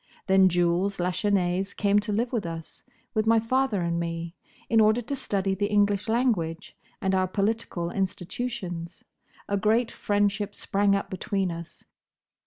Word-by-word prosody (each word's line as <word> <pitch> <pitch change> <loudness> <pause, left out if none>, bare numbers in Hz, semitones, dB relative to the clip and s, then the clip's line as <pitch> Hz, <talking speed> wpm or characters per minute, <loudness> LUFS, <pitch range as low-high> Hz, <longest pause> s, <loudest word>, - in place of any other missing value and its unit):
Then 190 -1 +5
Jules 175 +3 +1
Lachesnais 180 +1 0
came 205 0 +3
to 210 +1 -3
live 235 +5 -1
with 230 -4 0
us—with 165 +6 -6
my 225 0 +5
father 230 -4 +1
and 170 0 0
me—in 170 +6 -2
order 215 +2 +4
to 245 +4 -3
study 195 -7 -1
the 205 +1 0
English 205 0 +2
language 220 -9 0 0.2
and 190 0 0
our 185 0 +2
political 195 -3 -1
institutions. 185 -2 -4 0.4
A 200 - 0
great 220 +3 +2
friendship 205 0 0
sprang 200 0 +1
up 200 - -3
between 190 0 -1
us. 170 0 -9
200 Hz, 140 wpm, -26 LUFS, 180-215 Hz, 0.4 s, Then